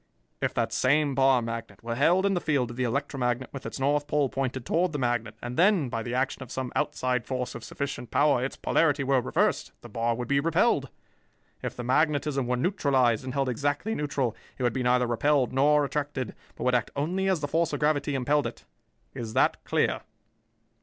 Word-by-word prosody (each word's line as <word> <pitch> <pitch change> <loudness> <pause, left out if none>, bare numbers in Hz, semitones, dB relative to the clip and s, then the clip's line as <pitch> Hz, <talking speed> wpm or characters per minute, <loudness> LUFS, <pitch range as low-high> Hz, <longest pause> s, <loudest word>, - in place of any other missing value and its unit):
"If - - -1
that - - 0
same 145 +2 +2
bar 135 -2 +4
magnet 115 0 -6
were 115 0 -3
held 170 +10 +3
in 200 - +2
the 175 - 0
field 135 -6 0
of - - -8
the 130 - -1
electromagnet 125 -1 -1
with 135 - -6
its - - -6
north 145 +2 +1
pole 150 -2 +1
pointed 130 -2 -3
toward 170 0 +1
the - - -1
magnet 120 -4 -1
and 120 +1 -5
then, 180 -6 +4
by 115 -1 -3
the 120 +2 -4
action 130 +1 -1
of 130 -1 -8
some 130 -2 -3
outside 130 -4 0
force 125 -1 -3
of 120 - -8
sufficient 130 -1 -5
power, 145 -2 +3
its 135 - -3
polarity 145 -3 +2
were 135 -1 +2
reversed, 90 - 0
the - - -11
bar 115 +2 0
would 120 0 -4
be 140 +1 +2
repelled. 165 +3 +2 0.7
If - - -4
the 120 - -5
magnetism 145 0 +1
were 125 0 0
neutralized 130 - +2
and 130 0 -5
held 135 -1 +1
exactly 145 - -1
neutral, 140 - -1 0.2
it 130 - -4
would 120 -2 +2
be 130 - -2
neither 125 0 +3
repelled 130 +3 +1
nor 145 +2 +4
attracted, 140 -3 -3 0.2
but - - -6
would 125 0 +2
act 120 -2 +1
only 180 +7 0
as 185 -5 +1
the 145 - -1
force 165 +3 +1
of 145 - -2
gravity 150 -1 +1
impelled 140 +1 +1
it. 115 -1 -10 0.5
Is 110 -2 -6
that - - +2
clear?" - - +1
135 Hz, 205 wpm, -27 LUFS, 125-150 Hz, 0.7 s, bar